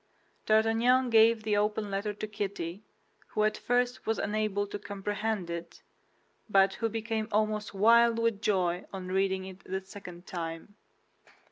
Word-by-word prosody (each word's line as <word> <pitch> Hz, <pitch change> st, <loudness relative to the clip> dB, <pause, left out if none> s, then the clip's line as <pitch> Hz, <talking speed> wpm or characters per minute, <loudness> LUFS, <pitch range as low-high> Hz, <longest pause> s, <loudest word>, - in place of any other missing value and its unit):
D'Artagnan 230 Hz, +4 st, +3 dB
gave 225 Hz, 0 st, +5 dB
the 210 Hz, -1 st, +1 dB
open 210 Hz, 0 st, 0 dB
letter 200 Hz, +2 st, -1 dB
to 210 Hz, +1 st, -6 dB
Kitty, 200 Hz, -3 st, -4 dB, 0.5 s
who 215 Hz, -, 0 dB
at 215 Hz, -, +2 dB
first 245 Hz, 0 st, 0 dB
was 225 Hz, -1 st, +1 dB
unable 210 Hz, -1 st, -1 dB
to 205 Hz, 0 st, -6 dB
comprehend 205 Hz, 0 st, -3 dB
it, 170 Hz, 0 st, -7 dB, 0.7 s
but 195 Hz, -1 st, +4 dB
who 225 Hz, +3 st, -1 dB
became 225 Hz, 0 st, -3 dB
almost 215 Hz, 0 st, 0 dB
wild 230 Hz, +3 st, +5 dB
with 230 Hz, -3 st, 0 dB
joy 180 Hz, -4 st, +1 dB
on 185 Hz, -2 st, -6 dB
reading 190 Hz, 0 st, 0 dB
it 190 Hz, -1 st, -11 dB
a 190 Hz, +1 st, -2 dB
second 180 Hz, -3 st, -10 dB
time. 165 Hz, +2 st, -6 dB
210 Hz, 145 wpm, -30 LUFS, 190-220 Hz, 0.7 s, gave